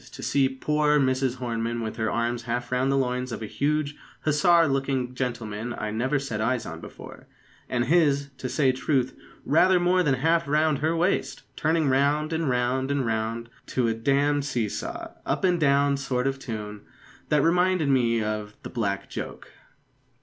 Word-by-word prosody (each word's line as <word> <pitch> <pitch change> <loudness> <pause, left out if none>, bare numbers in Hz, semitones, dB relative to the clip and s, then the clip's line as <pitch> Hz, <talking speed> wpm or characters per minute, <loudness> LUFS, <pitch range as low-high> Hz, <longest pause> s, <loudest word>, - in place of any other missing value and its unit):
to - - -9
see 135 -2 +2
poor 150 +2 +1
Mrs 130 -1 +1
Hornem 115 -1 -2
with 110 0 -5
her 110 -1 0
arms 120 +1 -1
half 120 +1 -2
round 130 +2 +1
the 135 - +2
loins 125 -1 -1
of 115 - -5
a - - -3
huge 145 +5 -1 0.3
hussar 165 +2 +4
looking 135 -2 -1
gentleman 120 -2 -4
I 105 - -3
never 130 +7 0
set 125 -6 -3
eyes 120 +2 0
on - - -7
before; - - -11 0.4
and 120 0 0
his, 140 -2 +2
to 130 - -4
say 135 -1 +3
truth, 130 0 0 0.3
rather 180 +4 +4
more 180 +1 +3
than 145 -6 +2
half 165 +4 +1
round 150 0 +2
her 160 +3 +1
waist, 175 +4 0
turning 160 -1 +1
round, 145 +4 +2
and 160 -3 0
round, 125 +2 0
and 140 -2 0
round, 115 +1 -2 0.2
to 125 -2 0
a 115 - +1
d 115 +5 -1
d 145 +1 +2
see 125 -6 -1
saw, - - -5
up - - -2
and 180 -2 +3
down 140 -1 +3
sort 130 -2 -1
of 135 0 -1
tune, 105 -4 -6 0.5
that 150 -2 +3
reminded 180 -1 +2
me 120 -4 +2
of 105 -1 -4
the - - -7
"Black 100 -5 -2
joke." - - -7
135 Hz, 180 wpm, -26 LUFS, 120-150 Hz, 0.5 s, hussar